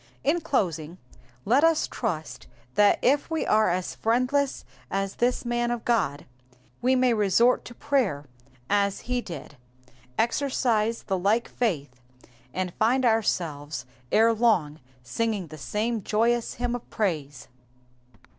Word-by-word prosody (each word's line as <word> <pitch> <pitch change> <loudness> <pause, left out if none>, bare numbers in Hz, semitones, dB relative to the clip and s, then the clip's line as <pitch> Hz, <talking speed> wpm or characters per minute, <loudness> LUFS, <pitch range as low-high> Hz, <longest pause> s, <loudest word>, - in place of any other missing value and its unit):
In 325 +5 +2
closing, 175 - -1 0.5
let 260 +7 +4
us 325 -1 +4
trust 165 -10 -4 0.3
that 205 +5 +5
if 285 +5 +2
we 320 -1 -1
are 215 -2 +3
as 180 +1 -2
friendless 255 +5 0 0.2
as 195 0 -2
thLs 245 +1 +1
man 240 0 0
of 240 -1 -3
God, 195 - 0 0.6
we 255 +2 +3
may 255 -1 +3
resort 220 +3 +3
to 240 - -10
prayer 225 - 0 0.4
as 200 -1 +1
he 250 0 -2
did, 150 - -9 0.6
exercise 235 -3 +1
the 190 -2 -1
like 210 +6 +2
faith, 145 - -2 0.5
and 185 +2 -3
find 250 +4 +3
ourselves 155 - 0 0.3
ere 225 +1 +5
long 190 -10 +2 0.2
singing 205 - -1
the 155 - -9
same 220 - -2
joyous 230 +4 +1
hymn 245 0 -2
of 245 - -6
praise. 150 - -2
220 Hz, 130 wpm, -26 LUFS, 180-245 Hz, 0.6 s, that